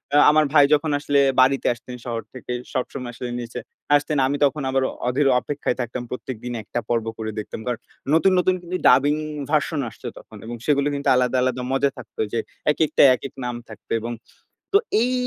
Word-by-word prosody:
আ - - +7
আমার 155 0 +4
ভাই 145 -2 +8
যখন 150 +1 +2
আসলে 145 -1 +2 0.2
বাড়িতে 135 +1 +3
আসতেন 120 +1 -10
শহর 115 -2 -3
থেকে, 130 -1 -8 0.2
সবসময় 125 -1 -3
আসলে 120 +1 -6
নিচে 120 0 -6 0.4
আসতেন। 145 +1 +1
আমি 145 +2 -1
তখন 145 +2 0
আবার 135 0 +1 0.2
অধীর 135 +3 +2
অপেক্ষায় 140 0 -2
থাকতাম, 120 +1 -4
প্রত্যেকদিন 125 -1 -5
একটা 115 - -3
পর্ব 115 -2 +1
করে 110 -1 -4
দেখতাম। 105 - -6
কারণ 120 -2 -1 0.3
নতুন, 165 +4 +5
নতুন 185 +1 +3
কিন্তু 180 +1 -4
ডাবিং 135 +4 +5 0.4
ভার্সন 155 0 +1
আসছে 115 +3 -10
তখন 110 - -13
এবং 120 +1 -5
সেগুলো 145 -1 +2
কিন্তু 140 - -4
আলাদা, 125 0 +2
আলাদা 130 0 0
মজা 135 +1 +2
থাকত 120 -4 -12 0.2
যে, 115 - +1 0.3
একেকটা 155 0 +3
একেক 135 +2 -8
নাম 125 -1 -3
থাকত 110 - -13
এবং 120 +2 -4 0.6
তো - - +8 0.2
এই 250 +1 0
130 Hz, 185 wpm, -23 LUFS, 120-145 Hz, 0.6 s, ভাই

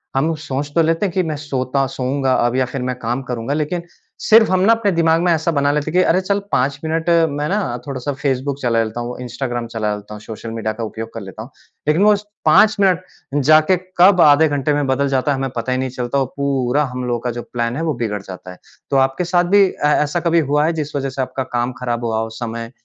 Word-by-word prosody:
हम 155 +5 +1
सोच 145 -1 -4
तो 170 - +5
लेते 165 +4 +1
हैं 185 - -2
कि 185 -1 +1
मैं 155 -3 -3
सोता 135 -2 -1
सोऊँगा 130 +1 -1
अब 120 +1 0
या 130 0 +2
फिर 130 +1 -5
मैं - - -4
करूँगा 125 +1 -2
लेकिन 155 +3 -2 0.4
सिर्फ़ 220 -1 +5
हम 185 - +3
ना 205 +5 +5
अपने 225 -3 +1
दिमाग 165 -1 +2
में 175 0 +2
ऐसा 160 +1 0
बना 140 -2 +1
लेते 150 +1 -1
हैं - - -11
कि - - +5
अरे 180 - +3
चल 200 +2 0
5 135 +2 +1
मिनट 160 +1 -1 0.2
मैं 145 +1 -2
ना 200 - +1 0.3
थोड़ा-सा 140 0 -4
फ़ेसबुक 135 0 -2
चला 115 -2 +2
लेता 110 +2 -5
हूँ, 120 +1 -5
इंस्टाग्राम 120 -1 -4
चला 110 -2 -2
लेता 105 +1 -10
हूँ, 105 - -9
सोशल 110 +1 -8
मीडिया 110 -1 -3
का 115 +1 -6
उपयोग 110 +1 -6
कर 115 - -6
लेता 95 +2 -9
हूँ। 125 - -13 0.4
लेकिन 155 +6 +3
वो 210 0 +6
उस 205 0 -3 0.2
5 210 +8 +5
मिनट 185 -3 +3 0.5
जाके 155 +4 +5 0.2
कब 180 0 +6
आधे 150 +1 +6
घंटे 145 0 0
में 145 0 0
बदल 135 +2 +1
जाता 135 +1 +1
है 135 - 0
हमें 135 0 -2
पता 120 +2 -2
ही 130 - +1
नहीं 130 0 -2
चलता 125 +1 -3
और 135 - +1
पूरा 140 0 +1
हम 125 0 -4
लोगों 120 -1 -1
का 125 +1 -3
जो - - -3
प्लान 120 0 -1
है 155 - -3
वो 160 -2 0
बिगड़ 105 -3 -3
जाता 95 -1 -10
है। 90 - -12 0.3
तो 135 - +3
आपके 135 +5 +1
साथ 175 0 +2
भी 200 - +7
ए 190 - -3
ऐसा 150 +2 +2
कभी 170 0 +2
हुआ 150 +1 +3
है 165 - +1
जिस 150 -2 -4
वजह 135 -1 -1
से 130 0 -4
आपका 130 +1 -3
काम 120 +1 0
ख़राब 120 -1 -2
हुआ 110 -1 0
हो 110 - -2
उस 110 0 -10
समय 115 0 -5
135 Hz, 255 wpm, -19 LUFS, 120-160 Hz, 0.5 s, भी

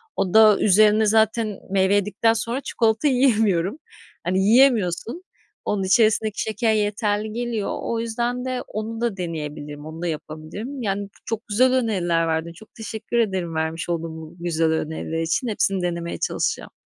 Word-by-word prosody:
O 185 - -1
da 215 -2 +7
üzerine 215 +2 +5
zaten 220 -1 +2
meyve 195 0 +3
yedikten 205 +3 +2
sonra 230 +3 -2
çikolata 225 +1 +1
yiyemiyorum. 220 - +2 0.5
Hani, 185 +2 0
yiyemiyorsun. 230 - +3 0.4
Onun 200 -2 0
içerisindeki 215 +2 +2
şeker 220 +1 0
yeterli 210 0 -1
geliyor. 235 -3 -2
O 230 - -2
yüzden 240 +2 -2
de 255 -1 -2
onu 225 +2 -5
da 235 -4 -1
deneyebilirim, 150 -4 -6
onu 160 +1 -8
da 175 - -2
yapabilirim. 160 - -6
Yani, 200 -2 -2 0.2
çok 225 0 -4
güzel 250 +5 +3
öneriler 180 -9 +1
verdin. 160 +1 -2
Çok 220 +6 -17
teşekkür 220 +1 -4
ederim 190 -7 0
vermiş 160 +1 -2
olduğun 165 -1 -3
bu 160 +1 -10
güzel 165 -1 0
öneriler 160 +1 -2
için. 165 +10 -1
Hepsini 195 -3 0
denemeye 170 -1 -3
çalışacağım. - - -2
205 Hz, 150 wpm, -23 LUFS, 170-225 Hz, 0.5 s, da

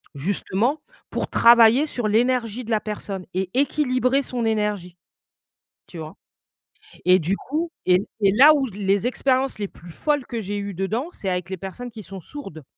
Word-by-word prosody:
justement, 200 - -1 0.3
pour - - -3
travailler 235 +3 +6
sur 245 -7 -2
l'énergie 240 +1 +1
de - - -10
la 215 -1 +2
personne 200 -3 -6
et 185 0 -2
équilibrer 265 -1 +1
son 250 -3 -4
énergie, 210 -5 -1 0.9
tu 175 - -10
vois? 155 -1 -8 0.9
Et 185 +1 +6
du 185 +3 -1
coup 320 +9 -3 0.2
et 180 +1 +4 0.2
c'est 200 -2 +4
là 290 +7 +8
où 280 -3 +1
les 200 +1 0
expériences 260 0 0
les 205 -1 -3
plus 175 -1 -14
folles 290 - -1
que 235 - -4
j'ai 205 0 -4
eues 200 0 -4
dedans, 215 - -2
c'est 195 - -6
avec 180 0 -2
les 190 - -4
personnes 220 +7 -7
qui 220 -2 -10
sont 190 +1 -9
sourdes. 170 - -10
215 Hz, 175 wpm, -23 LUFS, 190-255 Hz, 0.9 s, là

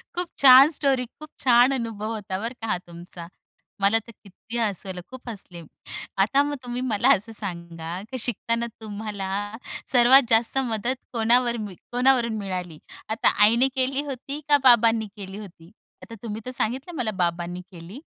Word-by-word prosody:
खूप 355 0 -1
छान! 270 +1 +9
स्टोरी 275 -4 0
खूप 305 -1 -10
छान 250 +1 +5
अनुभव 225 -3 -3
होता 195 -3 -5
बरं 230 +3 -4
का 225 - -4
हा - - 0
तुमचा. 170 0 -10 0.5
मला 200 +3 +4
तर - - -11
किती 210 +4 -8
हसवलं, 195 -4 -2
खूप 260 -1 -11
हसले. 185 -6 -9 0.6
आता 270 +8 +3
मग 290 0 -3
तुम्ही 245 0 -4
मला 245 -1 +1
असं 220 +4 -5
सांगा, 170 -4 -5
की 260 - -4
शिकताना 235 0 -2
तुम्हाला 205 -2 -5 0.6
सर्वात 250 +2 +7
जास्त 230 +3 +3
मदत 240 -1 -1 0.2
कोणावर 235 +1 +2
मी 205 -3 -6 0.2
कोणावरून 245 -2 +2
मिळाली? 180 -5 -5 0.3
आता 220 +1 +1 0.2
आईने 235 +5 +5
केली 265 +2 +1
होती 275 +2 -6
का 290 - +6
बाबांनी 230 -3 +5
केली 195 -1 -8
होती? 175 -4 -12 0.3
आता 230 - -10
तुम्ही 220 -1 -5
तर - - -4
सांगितलं 260 +7 -3
मला, 225 -6 -1
बाबांनी 175 -2 -2
केली 180 +8 -11
225 Hz, 160 wpm, -24 LUFS, 195-255 Hz, 0.6 s, छान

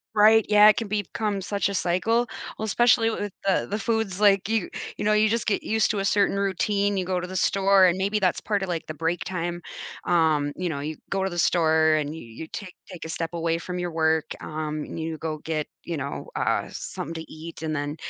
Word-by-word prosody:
Right, 220 +1 +6
yeah, 210 0 +8
it 215 - +7
can 225 -3 -3
become 205 0 -2
such 200 +1 -1
a - - -3
cycle. 220 +7 +1 0.3
Well, 220 - -2
especially 225 +1 +4
with 205 -2 -3 0.2
the 195 - +2
the 210 - -1
foods, 220 -4 -1
like, 200 -1 +4
you 220 -5 0 0.3
you - - -3
know, 215 - +4
you 215 +1 +4
just 230 +1 -1
get 210 - +1
used 220 0 +1
to 210 - -2
a 195 - -1
certain 200 0 +2
routine. 200 +1 0
You 185 - -1
go 180 0 -1
to 180 - -5
the 185 +1 -4
store, 195 +1 +4
and 180 0 +3
maybe 200 +3 0
that's 185 -3 +1
part 205 -2 -1
of, 190 - -2
like, 170 -3 -3
the 155 - -4
break 165 +3 -1
time, 175 -1 -3 0.4
um, 155 -4 +2
you 180 - -2
know, 150 -4 -3
you 155 +1 -4
go 195 -1 0
to 190 - 0
the 175 -1 -4
store, 160 -2 +4
and 150 -2 0
y 155 - -6
you 120 +3 -9
take 185 +1 -8 0.2
take 175 -3 -8
a - - -6
step 165 0 -3
away 165 -1 0
from 180 +2 -5
your 175 0 -2
work, 160 -1 +2 0.2
um, 155 -1 -4
and - - -7
you 160 0 -3
go 155 0 -4
get, 155 -2 -2 0.2
you 170 - -3
know, 140 -2 -5
uh, - - 0
something 165 - -6
to 160 -1 -8
eat. 160 +1 -9
And 160 -1 -2
then, 145 0 -2
180 Hz, 240 wpm, -25 LUFS, 160-205 Hz, 0.4 s, yeah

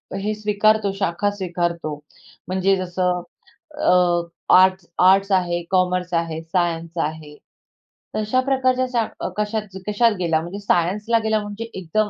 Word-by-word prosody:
हे 205 +2 -2
स्वीकारतो, 210 0 +2
शाखा 195 +2 0
स्वीकारतो. 175 -5 -3 0.5
म्हणजे 190 +2 +2
जसं 180 -1 -1 0.6
अ, 180 -4 +3 0.3
आर्ट्स-आर्ट्स 185 +1 +4
आहे, 175 -2 +1
कॉमर्स 180 -1 +1
आहे, 165 -1 -1
सायन्स 170 0 -2
आहे. 155 -1 -7 0.8
तशा 215 +4 +1
प्रकारच्या 255 -1 +1
शा 230 -2 +2 0.3
कशा 210 +1 0 0.3
कशात 230 +3 +3
गेला, 165 -3 +1
म्हणजे 175 +5 -7
सायन्सला 205 +5 +1
गेला 220 -1 +1
म्हणजे 205 +2 -6
एकदम, 200 +4 -1
185 Hz, 120 wpm, -21 LUFS, 175-210 Hz, 0.8 s, आर्ट्स-आर्ट्स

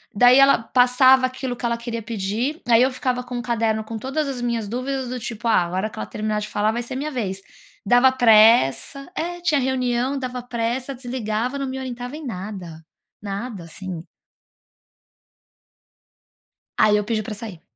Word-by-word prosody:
daí 245 +4 +7
ela 275 0 +6
passava 255 +2 +4
aquilo 255 -1 -4
que 245 - -6
ela 235 0 0
queria 235 0 -5
pedir, 225 +7 -3
aí 235 -1 +5
eu 260 +2 +3
ficava 255 -1 -2
com 245 0 -6
o - - -2
caderno 225 -3 0
com 225 +1 -6
todas 270 +6 -2
as 265 -3 -4
minhas 235 -3 -2
dúvidas 255 +3 -3
do 250 0 -4
tipo: 235 0 -5
"Ah, 220 -5 +4
a - - -6
hora 190 +4 -2
que - - -10
ela - - -3
terminar 215 0 -2
de 210 - -4
falar 210 +1 0
vai 235 +2 -2
ser 240 - -6
minha 290 +3 -3
vez". 195 -7 -3 0.4
Dava 245 +5 +5
pressa 230 - +4
é, 350 0 -4
tinha 310 -4 +2
reunião, 255 0 0
dava 250 -1 -4
pressa, 245 +2 -2
desligava, 245 0 -3
não 275 -1 -3
me 265 0 -4
orientava 250 0 -6
em 310 0 -8
nada, 185 -7 -7 0.4
nada 200 0 -5
assim. 170 0 -7 2.7
Aí 210 -1 +5
eu 210 - 0
pedi 215 0 -2
pra 220 - -6
sair, 205 -5 -8
240 Hz, 180 wpm, -22 LUFS, 215-260 Hz, 2.7 s, daí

